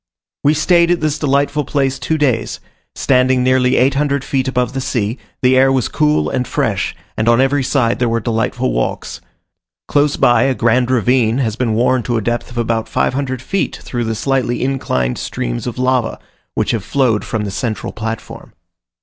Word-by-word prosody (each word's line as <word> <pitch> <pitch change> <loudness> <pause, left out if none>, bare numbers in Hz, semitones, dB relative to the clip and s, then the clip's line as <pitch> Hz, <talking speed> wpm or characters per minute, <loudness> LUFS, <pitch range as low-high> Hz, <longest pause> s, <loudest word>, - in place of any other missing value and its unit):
We 150 +2 +4
stayed 170 +2 +3
at 175 -1 +2
this 155 -1 -1
delightful 145 +1 +1
place 135 -2 -1
two 160 - -1
days; 130 -6 0 0.4
standing 130 -1 +2
nearly 130 0 +3
800 140 +1 +1
feet 135 -1 -1
above 125 -1 0
the 135 - -2
sea, 115 -1 -2 0.2
the 130 +1 +4
air 135 +1 +5
was 130 -3 +1
cool 150 -1 +1
and 125 -2 -2
fresh, - - -1 0.2
and 110 +2 +1
on 120 +1 +4
every 135 +1 +2
side 125 -3 +1
there 120 -1 +1
were 115 0 +1
delightful 115 - -1
walks. - - -3 0.7
Close 145 0 +2
by, 120 -2 +4
a 135 -1 +1
grand 120 +2 +2
ravine 125 -1 +2
has 115 -6 -1
been 115 -2 -1
worn 125 +2 +2
to 120 0 -1
a - - -1
depth 120 +1 -2
of 120 - -10
about 115 -1 -1
500 130 -1 -1
feet 195 +6 -1
through 120 -2 -3
the 110 0 -2
slightly 125 0 -1
inclined 65 - -1
streams - - -4
of 120 - -5
lava, 130 -1 0 0.4
which - - 0
have 110 -5 -2
flowed 120 -3 +1
from 110 -2 -3
the 100 - -4
central 110 +3 -3
platform. 110 +1 -6
125 Hz, 185 wpm, -17 LUFS, 115-135 Hz, 0.7 s, air